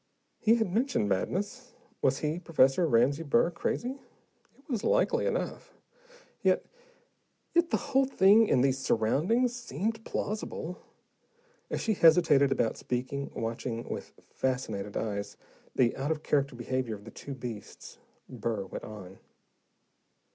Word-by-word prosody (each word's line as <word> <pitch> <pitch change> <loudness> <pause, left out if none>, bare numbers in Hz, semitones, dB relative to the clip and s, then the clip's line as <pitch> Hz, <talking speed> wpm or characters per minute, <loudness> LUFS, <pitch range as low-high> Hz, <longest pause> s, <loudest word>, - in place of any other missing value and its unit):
He 225 +1 +4
had 220 -6 0
mentioned 235 - +1
madness: 205 - -2 0.3
was 135 0 +3
he, 155 +3 -2
Professor 165 -1 +3
Ramsey 135 +4 +3
Burr, 150 +1 +2
crazy? 250 +9 -3 0.6
It 275 - -26
was 235 -7 -2
likely - - +2
enough. - - -3 0.7
Yet - - +2 0.9
yet 340 0 +3
the - - +2
whole 270 -1 +2
thing, 210 -2 +5
in 125 - +3
these 135 0 +2
surroundings, 160 - +1
seemed 225 - -3
plausible. 200 -6 -4 0.9
As - - -2
she 220 - +1
hesitated 160 -6 +5
about 115 -4 +1
speaking, 130 +3 -3
watching 115 +1 -3
with - - -5 0.2
fascinated 110 -6 -2
eyes 100 -2 -3 0.4
the 120 -2 +3
out 135 +2 -2
of 155 -1 -1
character 140 -3 +1
behavior 120 -1 -2
of 100 0 -14
the 115 - -9
two 140 - -8
beasts, 120 -5 -8 0.3
Burr 110 -4 -3
went - - -7
on. 100 -3 -10
140 Hz, 135 wpm, -29 LUFS, -, 0.9 s, thing